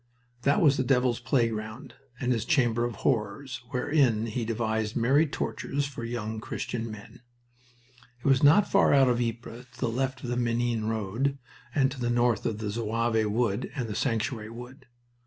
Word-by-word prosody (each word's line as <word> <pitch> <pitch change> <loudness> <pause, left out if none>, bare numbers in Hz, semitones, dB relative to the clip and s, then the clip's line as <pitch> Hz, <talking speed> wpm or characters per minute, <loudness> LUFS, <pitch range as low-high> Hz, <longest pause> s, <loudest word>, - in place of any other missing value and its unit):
That 140 +5 +3
was 145 -3 +5
the 130 - +1
devil's 125 -2 +2
playground 115 0 -1 0.3
and 125 - 0
his 115 -4 +1
chamber 120 -4 +2
of 120 -2 -4
horrors, 120 +2 -1
wherein 125 -4 +2
he 115 +1 -3
devised 110 -1 -1
merry 135 +7 +3
tortures 145 0 -2
for 135 -4 -7
young 110 -2 -4
Christian 115 0 -4
men. 110 +1 -11 1.0
It 120 - -21
was 135 -2 +4
not 160 +8 +6
far 195 -7 +4
out 135 -2 +5
of 120 0 +1
Ypres, 120 +1 -4
to - - -17
the - - 0
left 130 +3 -2
of 120 - -3
the 120 - -1
Menin 120 -2 0
road, 115 +6 -1 0.4
and 135 -2 +3
to 135 - -8
the 120 -1 -1
north 120 -2 +2
of 110 -1 -3
Zouave 110 +1 0
Wood 105 -1 0
and 115 -7 -3
Sanctuary 115 -2 -1
Wood. 125 +3 -11
120 Hz, 170 wpm, -28 LUFS, 110-130 Hz, 1.0 s, not